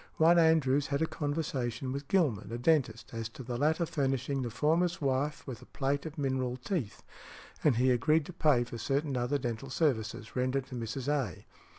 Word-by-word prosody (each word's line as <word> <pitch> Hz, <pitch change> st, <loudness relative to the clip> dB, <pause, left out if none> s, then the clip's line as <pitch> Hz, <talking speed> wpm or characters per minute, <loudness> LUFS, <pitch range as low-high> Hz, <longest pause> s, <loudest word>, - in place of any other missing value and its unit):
One 170 Hz, +2 st, +6 dB
Andrews 145 Hz, -4 st, +3 dB
had 140 Hz, +2 st, 0 dB
a -, -, +3 dB
conversation 145 Hz, -5 st, -2 dB
with 140 Hz, +1 st, -5 dB
Gilman, 120 Hz, -, +1 dB
a 120 Hz, -, -3 dB
dentist, 125 Hz, -5 st, +1 dB
as 115 Hz, -1 st, -4 dB
to 130 Hz, -, -10 dB
the 120 Hz, 0 st, -4 dB
latter 155 Hz, +6 st, +2 dB
furnishing 135 Hz, -2 st, -1 dB
the 120 Hz, -, -2 dB
former's 165 Hz, +8 st, +1 dB
wife 140 Hz, +1 st, -1 dB
with 125 Hz, -5 st, -7 dB
a -, -, -14 dB
plate 140 Hz, +2 st, -1 dB
of 160 Hz, +1 st, -9 dB
mineral 130 Hz, -3 st, -1 dB
teeth, 130 Hz, -, -3 dB, 0.6 s
and 145 Hz, -5 st, +4 dB
he 125 Hz, +2 st, +3 dB
agreed 150 Hz, +6 st, +3 dB
to 180 Hz, -, -9 dB
pay 150 Hz, -7 st, +3 dB
for 120 Hz, -1 st, -8 dB
certain 140 Hz, +4 st, -1 dB
other 125 Hz, +3 st, 0 dB
dental 120 Hz, 0 st, -4 dB
services 115 Hz, -7 st, -1 dB
rendered 130 Hz, +1 st, 0 dB
to 125 Hz, -, -6 dB
Mrs. 120 Hz, +3 st, -4 dB
A. 135 Hz, -, -1 dB
135 Hz, 190 wpm, -31 LUFS, 120-150 Hz, 0.6 s, One